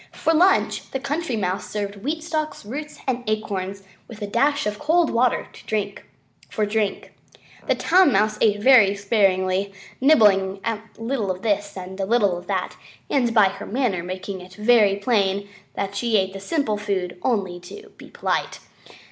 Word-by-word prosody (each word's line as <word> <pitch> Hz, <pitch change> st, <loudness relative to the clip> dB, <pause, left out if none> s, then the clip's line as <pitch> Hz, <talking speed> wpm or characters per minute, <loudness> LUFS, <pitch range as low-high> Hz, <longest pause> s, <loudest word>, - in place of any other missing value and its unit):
For 325 Hz, -, +1 dB
lunch 360 Hz, +4 st, +2 dB
the 265 Hz, -, -3 dB
Country 290 Hz, -1 st, -2 dB
Mouse 190 Hz, -3 st, -2 dB
served 205 Hz, -1 st, -4 dB
wheat 300 Hz, +10 st, -3 dB
stalks, 310 Hz, -7 st, -3 dB
roots, 295 Hz, +7 st, -6 dB
and 250 Hz, -2 st, -1 dB
acorns, 200 Hz, -2 st, -3 dB, 0.2 s
with 225 Hz, -3 st, -11 dB
a -, -, -1 dB
dash 275 Hz, +7 st, +1 dB
of 210 Hz, 0 st, -3 dB
cold 325 Hz, +2 st, +2 dB
water 245 Hz, +1 st, +1 dB, 1.0 s
for 215 Hz, -, -1 dB
drink. 210 Hz, -1 st, -2 dB, 0.5 s
The -, -, +3 dB
Town 360 Hz, -3 st, +4 dB
Mouse 215 Hz, 0 st, +1 dB
ate 210 Hz, -2 st, +3 dB
very 225 Hz, -7 st, +6 dB
sparingly, 195 Hz, -2 st, +1 dB, 0.3 s
nibbling 200 Hz, -9 st, +4 dB
a 225 Hz, -2 st, -1 dB, 0.2 s
little 225 Hz, -3 st, -2 dB
of 185 Hz, 0 st, -4 dB
this 205 Hz, -2 st, -1 dB
and 190 Hz, +1 st, -8 dB
a 195 Hz, -, 0 dB
little 210 Hz, -5 st, +2 dB
of 175 Hz, +1 st, -9 dB
that, -, -, -2 dB, 0.3 s
and 245 Hz, -4 st, +2 dB
by 215 Hz, -4 st, +5 dB
her 195 Hz, -, -8 dB
manner 230 Hz, -7 st, 0 dB
making 185 Hz, +2 st, -6 dB
it 180 Hz, 0 st, -13 dB
very 210 Hz, -2 st, +4 dB
plain 200 Hz, -2 st, 0 dB, 0.3 s
that 200 Hz, 0 st, -3 dB
she 225 Hz, +1 st, +1 dB
ate 190 Hz, -1 st, 0 dB
the 195 Hz, -, -7 dB
simple 220 Hz, 0 st, -1 dB
food 185 Hz, -4 st, -3 dB
only 195 Hz, -7 st, -1 dB
to 420 Hz, -, -12 dB
be -, -, -12 dB
polite. -, -, -2 dB
210 Hz, 165 wpm, -23 LUFS, 195-250 Hz, 1.0 s, very